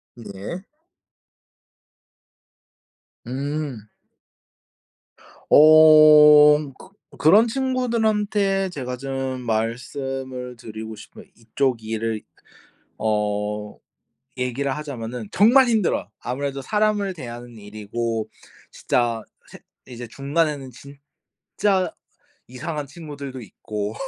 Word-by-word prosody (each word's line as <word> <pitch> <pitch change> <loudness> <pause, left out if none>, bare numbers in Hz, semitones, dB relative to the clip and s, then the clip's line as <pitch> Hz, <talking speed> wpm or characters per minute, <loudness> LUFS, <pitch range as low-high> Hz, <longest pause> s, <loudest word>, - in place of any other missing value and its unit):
네. 115 - -8 2.6
음. 140 -3 -4 1.6
어. 150 -1 +7
그 185 - -16 0.3
그런 195 +11 +5
친구들한테 220 -6 0
제가 125 -6 -5
좀 135 -1 -4
말씀을 125 +2 -4
드리고 110 -1 -8
싶은 - - -13
이쪽 120 +1 -1
일을 110 0 -3 0.8
어 105 -1 -2 0.6
얘기를 130 +2 -2
하자면은 125 -6 -6
정말 245 +6 +5
힘들어요. 215 - 0
아무래도 135 +2 -4
사람을 210 +1 0
대하는 120 -5 -9
일이고 110 +2 -4 0.4
진짜 115 -2 -1 0.3
세 - - -12 0.3
이제 120 -1 -9
중간에는 140 0 -2 0.7
진짜 190 -4 -1 0.5
이상한 150 +3 -5
친구들도 140 -3 -9
있고, 105 0 -6
135 Hz, 180 characters per minute, -22 LUFS, 115-155 Hz, 2.6 s, 어